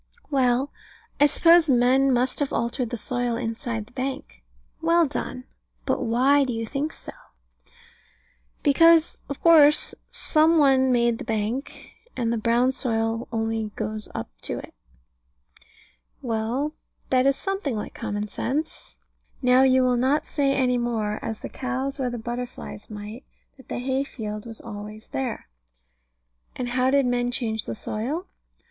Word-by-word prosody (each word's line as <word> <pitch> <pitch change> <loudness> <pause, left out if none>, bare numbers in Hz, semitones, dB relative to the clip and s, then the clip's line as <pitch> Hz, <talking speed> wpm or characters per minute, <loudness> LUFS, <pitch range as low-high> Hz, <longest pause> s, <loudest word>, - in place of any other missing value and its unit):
Well, 260 0 +2 0.5
I 290 - +7
suppose 335 +2 +5
men 260 +2 +4
must 250 +1 +1
have 285 -2 -1
altered 235 +1 -1
the 240 - -4
soil 245 +1 -1
inside 225 -1 -3
the 240 - -22
bank. 255 - -5 0.4
Well 335 +1 +4
done. 260 -3 -4 0.4
But - - 0
why 265 +5 +3
do 255 -2 -2
you 225 0 -3
think 285 +6 -2
so? - - -10 1.5
Because, 330 +3 +5
of 280 - -5
course, 305 -3 +6 0.2
some 320 +1 +2
one 265 -3 +4
made 235 -1 +2
the - - -5
bank; 225 +5 -3 0.2
and 235 -2 0
the 235 - -1
brown 235 +3 +3
soil 225 -2 -1
only 225 -1 -1
goes 215 0 -4
up 110 - -3
to - - -4
it. - - -9 1.5
Well, 240 +5 -1 0.4
that 260 0 +4
is 275 - +4
something 385 - -3
like 210 - -5
common 210 -2 -3
sense. 285 +9 -4 0.5
Now 250 +1 +5
you 260 -1 +5
will 250 -1 +2
not 265 +5 +2
say 275 -2 +1
any 250 -2 +2
more, 220 -3 -1
as 220 -1 -4
the - - -5
cows 265 +2 -3
or 255 -2 0
the 240 - -4
butterflies 240 -2 -6
might, 210 +3 -8 0.3
that 265 - -18
the - - -4
hay 260 +2 0
field 215 -4 -6
was 225 -1 -9
always 210 0 -9
there. 260 -4 -4 1.1
And 245 -1 -3
how 255 +1 +2
did 275 0 +3
men 245 0 +1
change 225 -4 -2
the - - -4
soil? 260 - -3
250 Hz, 150 wpm, -25 LUFS, 225-275 Hz, 1.5 s, I